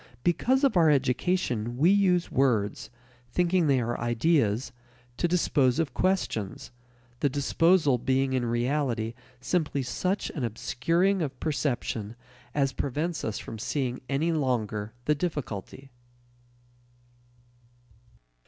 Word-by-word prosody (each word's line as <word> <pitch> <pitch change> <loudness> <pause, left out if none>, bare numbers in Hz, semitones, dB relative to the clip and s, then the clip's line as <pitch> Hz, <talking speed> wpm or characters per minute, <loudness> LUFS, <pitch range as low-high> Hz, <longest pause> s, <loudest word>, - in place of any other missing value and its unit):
Because 255 - +2
of 270 -6 +3
our 165 -3 +5
education 125 -4 0
we 165 +8 +5
use 185 -3 +2
words, 120 -6 +1 0.4
thinking 175 0 +2
they 135 -2 +3
are 120 0 -2
ideas, 120 -1 +1 0.5
to 175 - +1
dispose 145 -7 +2
of 165 -3 -1
questions, 180 - -1 0.5
the 145 - +2
disposal 145 0 +3
being 130 +2 +1
in 130 -2 +1
reality 120 -1 -1 0.3
simply 150 -2 0
such 185 +10 -2
an 145 - -4
obscuring 165 - 0
of 135 -5 -4
perception 120 -7 -2 0.4
as 135 -2 +1
prevents 150 +6 -2
us 110 - -2
from 110 - -7
seeing 130 +1 -2
any 150 +5 +1
longer 110 -8 -1
the 150 - +3
difficulty. 140 - -5
140 Hz, 115 wpm, -27 LUFS, 120-170 Hz, 0.5 s, our